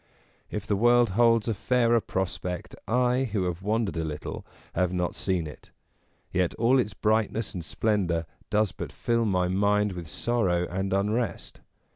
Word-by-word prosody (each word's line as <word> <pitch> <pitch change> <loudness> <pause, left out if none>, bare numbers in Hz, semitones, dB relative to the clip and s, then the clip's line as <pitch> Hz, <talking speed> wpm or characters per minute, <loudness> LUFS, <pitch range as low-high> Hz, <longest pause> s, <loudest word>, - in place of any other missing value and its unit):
If 105 -1 -4
the 105 - +1
world 120 +1 +4
holds 115 +2 +4
a 115 - +1
fairer 120 +2 +2
prospect, 90 -2 -3
I, 125 +2 +2
who 100 -3 0
have 90 0 -2
wandered 105 -1 0
a 80 - 0
little, 75 -1 -5 0.3
have 90 0 +1
not 90 -1 -1
seen 90 -4 -1
it; 75 - -11 0.6
yet 90 -1 +1
all 125 +4 +4
its 105 -5 -1
brightness 110 +1 0
and 90 - -5
splendour 90 -4 0 0.2
does 105 -2 +2
but - - -6
fill 115 -1 0
my 90 -3 +1
mind 100 +2 +2
with 90 -3 -7
sorrow 90 -1 0
and 95 +2 -2
unrest. 105 +4 -1
100 Hz, 160 wpm, -27 LUFS, 90-115 Hz, 0.6 s, world